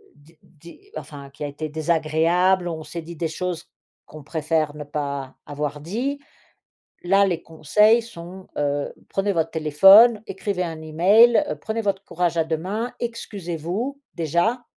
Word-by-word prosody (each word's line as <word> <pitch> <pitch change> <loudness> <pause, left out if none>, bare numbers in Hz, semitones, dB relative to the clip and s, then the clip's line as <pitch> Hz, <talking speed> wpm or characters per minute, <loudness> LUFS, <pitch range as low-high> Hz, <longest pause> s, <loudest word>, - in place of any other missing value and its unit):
d 150 +3 -23
dé 170 - -17
enfin, 140 -2 -9
qui 140 - -9
a - - -2
été 145 +2 -5
désagréable, 165 +4 +1
on 160 -2 -5
s'est 170 +2 -7
dit 170 +1 -10
des 165 +1 -2
choses 180 +1 -4 0.4
qu'on 155 -1 -12
préfère 155 -1 -1
ne 150 - -6
pas 140 -2 -5
avoir 145 0 -4
dit. 245 - -3 0.9
Là, 195 +2 +4
les 175 -3 -2
conseils 210 +9 +3
sont, 185 -4 -11
heu: 145 0 -1 0.2
«Prenez 195 +1 0
votre 165 -2 0
téléphone, 195 +9 +6
écrivez 195 -1 -3
un 165 -2 -4
e-mail, 195 - +4 0.2
prenez 220 +1 -3
votre 200 -2 -2
courage 175 -2 -1
à 165 - +2
deux 160 0 -1
mains, 210 +8 -4
excusez-vous, 210 - -4
déjà». 170 - 0
170 Hz, 150 wpm, -23 LUFS, 155-200 Hz, 0.9 s, téléphone